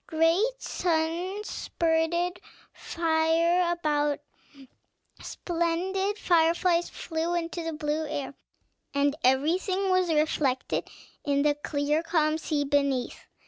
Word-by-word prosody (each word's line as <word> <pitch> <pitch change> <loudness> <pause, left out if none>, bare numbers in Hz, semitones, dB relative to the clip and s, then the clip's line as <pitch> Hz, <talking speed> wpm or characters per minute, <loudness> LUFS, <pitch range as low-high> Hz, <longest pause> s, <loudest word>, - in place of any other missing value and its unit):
Great 335 +10 +2
suns 350 +4 -1
spurted 340 +2 -1 0.3
fire 335 +2 +1
about, 295 -4 0 1.0
splendid 365 +4 -2
fireflies 345 -1 +2
flew 330 +1 -3
into 340 0 -3
the 325 0 -3
blue 300 0 -2
air, 285 -2 -4 0.6
and 285 0 +2
everything 360 +9 +2
was 370 -2 +2
reflected 300 -4 0 0.4
in 280 -2 +1
the 295 -1 +3
clear, 295 +1 -1
calm 320 -2 +1
sea 300 -2 -1
beneath. 280 -3 -1
325 Hz, 100 wpm, -27 LUFS, 300-345 Hz, 1.0 s, the